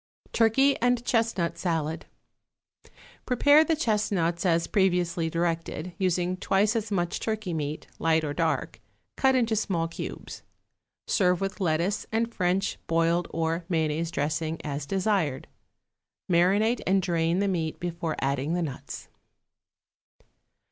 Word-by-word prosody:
=Turkey 270 Hz, +5 st, +4 dB
and 245 Hz, 0 st, +2 dB
Chestnut 225 Hz, -9 st, 0 dB
Salad.= 160 Hz, -3 st, -2 dB, 1.2 s
Prepare 285 Hz, +5 st, +5 dB
the 320 Hz, +1 st, +1 dB
chestnuts 200 Hz, -, 0 dB
as 165 Hz, -1 st, +2 dB
previously 175 Hz, -4 st, +1 dB
directed, 165 Hz, 0 st, -2 dB
using 180 Hz, -1 st, 0 dB
twice 200 Hz, +3 st, +1 dB
as 225 Hz, -1 st, -1 dB
much 175 Hz, -4 st, -1 dB
turkey 215 Hz, -5 st, -3 dB
meat, 150 Hz, -1 st, -3 dB
light 160 Hz, -1 st, +2 dB
or 145 Hz, -1 st, -2 dB
dark, 165 Hz, +1 st, -1 dB, 0.3 s
cut 265 Hz, 0 st, +3 dB
into 230 Hz, -3 st, +2 dB
small 175 Hz, -6 st, 0 dB
cubes. 165 Hz, -, -7 dB, 0.6 s
Serve 180 Hz, -4 st, +2 dB
with 195 Hz, +1 st, -4 dB
lettuce 175 Hz, +4 st, 0 dB
and 230 Hz, +1 st, 0 dB
French, 185 Hz, +1 st, 0 dB
boiled 165 Hz, +1 st, +2 dB
or 165 Hz, +1 st, -1 dB
mayonnaise 160 Hz, -1 st, 0 dB
dressing, 155 Hz, +1 st, -2 dB
as 145 Hz, -1 st, -4 dB
desired. 190 Hz, -7 st, 0 dB, 0.8 s
Marinate 195 Hz, +7 st, +3 dB
and 190 Hz, 0 st, +3 dB
drain 170 Hz, -1 st, +1 dB
the 200 Hz, +1 st, +1 dB
meat 165 Hz, -5 st, -2 dB
before 170 Hz, -2 st, -3 dB
adding 140 Hz, +4 st, -1 dB
the 175 Hz, -, 0 dB
nuts. 140 Hz, -2 st, -7 dB
175 Hz, 125 wpm, -27 LUFS, 165-205 Hz, 1.2 s, Prepare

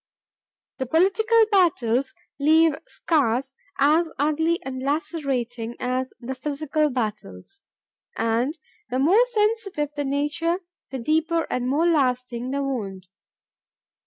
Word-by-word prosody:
The 260 Hz, -, -2 dB
political 440 Hz, -, +4 dB
battles 270 Hz, -, +2 dB, 0.2 s
leave 315 Hz, +2 st, +5 dB
scars 265 Hz, -4 st, 0 dB, 0.2 s
as 310 Hz, +4 st, +3 dB
ugly 320 Hz, +4 st, +1 dB
and 260 Hz, -1 st, -5 dB
lacerating 260 Hz, -6 st, -2 dB
as 255 Hz, +1 st, -2 dB
the 255 Hz, +2 st, -5 dB
physical 300 Hz, +3 st, -1 dB
battles, 215 Hz, -, -5 dB, 0.6 s
and 230 Hz, -, 0 dB, 0.3 s
the 255 Hz, -, -1 dB
more 355 Hz, -, +5 dB
sensitive 420 Hz, -, 0 dB
the 290 Hz, -, -1 dB
nature 300 Hz, +6 st, 0 dB, 0.3 s
the 265 Hz, -, -4 dB
deeper 320 Hz, +6 st, +1 dB
and 250 Hz, 0 st, -1 dB
more 290 Hz, +6 st, +2 dB
lasting 255 Hz, -6 st, +1 dB
the 280 Hz, +1 st, -1 dB
wound. 195 Hz, -9 st, -4 dB
280 Hz, 110 wpm, -24 LUFS, 250-325 Hz, 0.6 s, leave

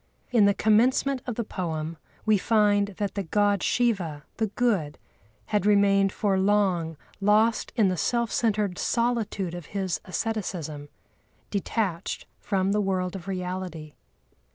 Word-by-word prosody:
In 230 Hz, -4 st, +5 dB
the 200 Hz, 0 st, +4 dB
commencement 255 Hz, +5 st, +3 dB
of 245 Hz, -, -2 dB
the 235 Hz, -, -1 dB
poem 165 Hz, -5 st, -4 dB, 0.3 s
we 215 Hz, -2 st, +4 dB
find 205 Hz, -1 st, +3 dB
that 205 Hz, -1 st, -2 dB
the 200 Hz, -, -2 dB
God 205 Hz, +2 st, +1 dB
Shiva, 185 Hz, -12 st, 0 dB
the 220 Hz, -, +1 dB
Good, 200 Hz, -9 st, 0 dB, 0.5 s
had 210 Hz, -3 st, 0 dB
remained 200 Hz, -1 st, +4 dB
for 195 Hz, -2 st, 0 dB
long 190 Hz, -5 st, +1 dB, 0.2 s
lost 215 Hz, +3 st, +3 dB
in 215 Hz, -6 st, +4 dB
the 185 Hz, -, -1 dB
self 235 Hz, +8 st, 0 dB
centred 210 Hz, -5 st, 0 dB
solitude 230 Hz, -6 st, 0 dB
of 175 Hz, -3 st, -7 dB
his 190 Hz, -3 st, -1 dB
asceticism, 180 Hz, -8 st, -4 dB, 0.6 s
detached 200 Hz, -3 st, -2 dB
from 195 Hz, 0 st, 0 dB
the 210 Hz, +1 st, +2 dB
world 185 Hz, -1 st, -1 dB
of 190 Hz, -1 st, -8 dB
reality. 180 Hz, -4 st, -4 dB
200 Hz, 135 wpm, -26 LUFS, 180-215 Hz, 0.6 s, In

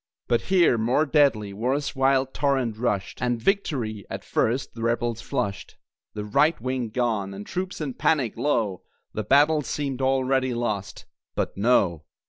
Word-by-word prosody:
But 120 Hz, -, +2 dB
here, 175 Hz, -11 st, +4 dB
more 125 Hz, +7 st, +2 dB
deadly, 135 Hz, -9 st, +2 dB
war's 130 Hz, +9 st, -1 dB
wild 135 Hz, 0 st, +2 dB
torrent 135 Hz, -6 st, 0 dB
rushed, 105 Hz, -5 st, -2 dB
And 120 Hz, -1 st, 0 dB
victory, 120 Hz, -, -1 dB
at -, -, -6 dB
first, 125 Hz, +4 st, 0 dB
the 115 Hz, -, -8 dB
Rebels 115 Hz, 0 st, 0 dB
flushed. 100 Hz, 0 st, -3 dB, 0.4 s
The 105 Hz, -1 st, -4 dB
"right 140 Hz, +10 st, +2 dB
wing" 125 Hz, -1 st, -2 dB
gone, 110 Hz, -5 st, -1 dB
and 100 Hz, +1 st, -7 dB
troops 185 Hz, +1 st, -4 dB
in 145 Hz, -5 st, -3 dB
panic, 135 Hz, -7 st, +1 dB
lo! 115 Hz, -8 st, 0 dB, 0.3 s
The 110 Hz, -, -2 dB
battle 145 Hz, +7 st, +4 dB
seemed 135 Hz, -2 st, -3 dB
already 130 Hz, -1 st, +1 dB
lost. 105 Hz, -4 st, -3 dB, 0.3 s
But, -, -, -2 dB
No. 95 Hz, -8 st, +2 dB
125 Hz, 150 wpm, -25 LUFS, 110-140 Hz, 0.4 s, here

